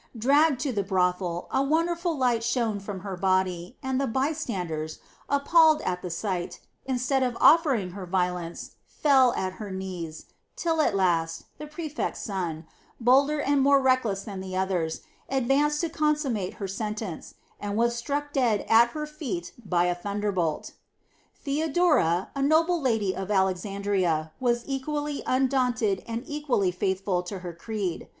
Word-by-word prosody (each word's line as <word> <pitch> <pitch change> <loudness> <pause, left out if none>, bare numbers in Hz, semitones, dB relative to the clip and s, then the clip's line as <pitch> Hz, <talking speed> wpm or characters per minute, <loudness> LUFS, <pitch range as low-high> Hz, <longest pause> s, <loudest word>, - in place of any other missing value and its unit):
Dragged 280 +4 +4
to 275 - 0
the 210 -4 0
brothel, 180 -2 0
a - - +2
wonderful 335 +3 0
light 245 -3 +1
shone 230 -3 0
from 195 -1 -6
her 195 -2 -5
body, 185 +2 0
and 265 0 0
the 275 - 0
by 265 +6 0
standers, 170 - -4 0.3
appalled 310 +2 +5
at 180 -1 -2
the 180 - -5
sight, 175 0 -3 0.3
instead 260 +1 +1
of 250 -2 0
offering 270 - +5
her 185 0 -7
violence, 180 -2 -2 0.2
fell 265 -4 +4
at 185 0 -2
her 210 - -5
knees, 185 -4 -6 0.3
till, 325 -2 +1
at 205 - +1
last, 165 -4 +1 0.2
the 300 - -7
prefect's 305 0 -4
son, 175 - -4 0.3
bolder 275 +5 +4
and 285 -1 +2
more 280 +1 +5
reckless 255 -7 +1
than 200 -4 -6
the 190 -1 -6
others, 180 -4 -1 0.3
advanced 275 +3 +2
to 335 - 0
consummate 300 - 0
her 200 - -4
sentence, 210 -2 -5 0.2
and 205 0 -3
was 235 +1 +2
struck 290 +4 -3
dead 235 -6 +1
at 230 +1 +6
her 300 - -2
feet 250 - -5
by 175 -3 +1
a 180 - +2
thunderbolt. 190 -3 -2 0.6
Theodora, 295 - +1
a 275 - -3
noble 325 +4 +3
lady 220 -7 +1
of 190 +1 -5
Alexandria, 190 -4 0
was 240 -2 +1
equally 290 +2 -3
undaunted 250 -6 +1
and 230 +1 -4
equally 285 -11 0
faithful 190 0 -1
to 180 +1 -7
her 175 - -5
creed. 190 0 -4
220 Hz, 150 wpm, -26 LUFS, 185-275 Hz, 0.6 s, at